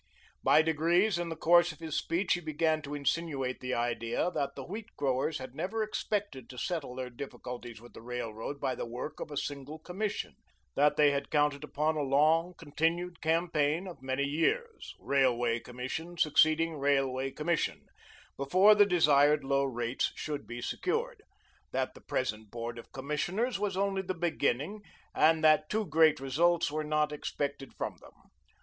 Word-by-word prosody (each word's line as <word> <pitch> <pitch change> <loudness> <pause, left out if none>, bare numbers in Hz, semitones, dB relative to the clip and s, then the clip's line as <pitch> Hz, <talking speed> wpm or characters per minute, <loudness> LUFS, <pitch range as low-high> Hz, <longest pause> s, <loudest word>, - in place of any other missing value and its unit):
By 155 - +5
degrees, 170 +5 +2
in 175 -1 -2
the 165 - -4
course 175 +2 +5
of 155 - -13
his 160 -2 -5
speech, 170 +2 +1
he 175 - 0
began 155 0 0
to 145 0 -6
insinuate 140 -3 -1
the 130 0 -2
idea 120 +7 -1
that 140 -5 -2
the 135 - -6
wheat 210 +6 -6
growers 140 +2 0
had 130 -1 -8
never 215 +9 -2
expected 205 - -3
to 125 - -10
settle 155 -3 -3
their 130 -1 -5
difficulties 120 -2 -8
with 120 +1 -15
the - - -11
Railroad 120 +2 -5
by 130 - -1
the - - -5
work 125 +6 -6
of - - -5
a 145 - -6
single 145 +2 -4
commission; 190 +6 -4 0.4
that 150 0 +4
they 150 -1 +6
had 140 0 -2
counted 145 -1 +1
upon 155 +1 -1
a - - 0
long, 155 +5 +3
continued 170 +4 -1
campaign 160 0 +1
of 175 -7 -9
many 130 +1 -1
years, 165 - -1
railway 120 -4 +2
commission 130 +9 -6
succeeding 155 +1 +3
railway 135 -1 +1
commission, 155 +4 -1 0.5
before 185 +10 +5
the 205 -1 +5
desired 150 -4 +4
low 140 0 +1
rates 120 -1 -1
should 150 -2 -5
be 120 0 -6
secured; 455 - -2 0.5
that - - -1
the - - -15
present 110 -4 -3
Board 115 +1 -5
of - - -13
Commissioners 180 - -2
was 200 -2 -1
only 195 0 +1
the 185 0 -4
beginning 165 - -1 0.3
and 160 0 +4
that 155 0 +5
too 215 0 0
great 160 -3 +4
results 160 +5 +2
were 155 +1 -2
not 150 0 +1
expected 140 -2 -4
from - - -4
them. - - -15
150 Hz, 170 wpm, -31 LUFS, 135-170 Hz, 0.5 s, they